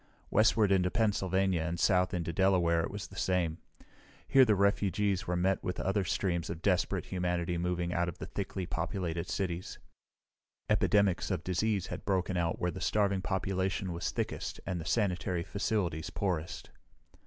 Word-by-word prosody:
Westward 110 -1 +4
into 90 -2 +3
Pennsylvania 95 -5 +1
and 85 +1 -3
south 90 -1 +3
into 85 -2 -2
Delaware 85 -2 +3
it - - -2
was 100 0 -6
the - - -13
same. 85 -3 0 0.7
Here 135 -1 +6
the 110 -3 +3
refugees 100 -1 +1
were 90 - 0
met 95 +2 +1
with 90 - -3
other 95 +1 +1
streams 85 -4 -1
of 85 0 -6
desperate 90 -3 +1
humanity 90 -1 -1
moving 90 0 -1
out 85 0 +1
of 85 - -8
the - - -6
thickly 95 -2 -4
populated 85 -1 -3
cities. 90 -2 -3 0.9
Epidemics 100 -4 +2
of 90 -4 -2
disease 100 +1 0
had - - -6
broken 95 -1 0
out 85 -1 0
where 90 - 0
the 95 - -8
starving 100 0 +1
population 95 -1 -1
was 85 - -2
thickest - - -3
and 90 -3 -2
the - - -8
sanitary 90 -5 0
facilities 95 -5 -1
poorest. 85 -4 -3
90 Hz, 160 wpm, -31 LUFS, 85-100 Hz, 0.9 s, Here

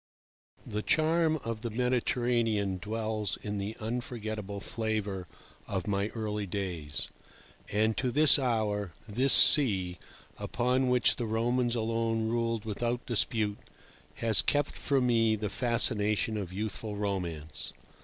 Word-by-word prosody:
The 105 0 -3
charm 160 +3 +2
of 115 -1 -4
the 120 - -3
Mediterranean 120 -4 0
dwells 110 -1 -3
in 105 -1 -3
the 105 +3 -5
unforgettable 110 -3 -4
flavour 105 -4 -3 0.4
of 95 -3 -3
my 100 0 0
early 105 -2 -3
days, 90 -6 -4 0.6
and 110 +2 +1
to 125 - 0
this 150 +2 +7
hour 105 -7 -1
this 125 +6 +2
sea, 95 - +7 0.4
upon 125 +2 0
which 125 -1 +3
the 120 - -3
Romans 120 +2 0
alone 115 0 -1
ruled 115 -1 -1
without 120 +3 -2
dispute, 110 -3 0 0.6
has 110 -3 +3
kept 145 -1 0
for 140 -2 0
me 115 -3 +3
the 105 -1 -3
fascination 110 -2 +1
of 100 -4 -4
youthful 105 +2 -4
romance. 90 -7 -4
110 Hz, 125 wpm, -29 LUFS, 105-120 Hz, 0.6 s, this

